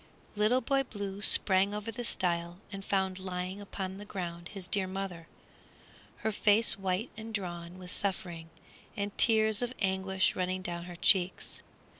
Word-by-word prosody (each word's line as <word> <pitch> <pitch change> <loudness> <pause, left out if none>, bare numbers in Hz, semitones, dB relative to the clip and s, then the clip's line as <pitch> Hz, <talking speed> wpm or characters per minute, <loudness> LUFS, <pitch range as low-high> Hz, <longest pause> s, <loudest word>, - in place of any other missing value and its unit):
Little 215 +5 +3
Boy 275 0 +2
Blue 205 -6 -5
sprang 195 0 +5
over 210 +2 -4
the 240 +2 -5
stile 175 -5 -1
and 195 -1 -6
found 190 -1 0
lying 185 +1 -4
upon 195 -1 -5
the - - -7
ground 175 -4 -5
his 195 -3 -7
dear 190 -1 +1
mother, 185 -3 -5 1.0
her 220 - +3
face 215 +2 +4
white 190 +3 -1
and 220 +1 -7
drawn 175 -4 -4
with 180 -1 -7
suffering, 175 -4 -2 0.5
and 200 0 -2
tears 220 -1 +4
of 245 +1 -2
anguish 190 -1 +1
running 185 0 -1
down 175 -1 -4
her 175 -1 -8
cheeks. 180 +1 +2
190 Hz, 155 wpm, -31 LUFS, 180-205 Hz, 1.0 s, sprang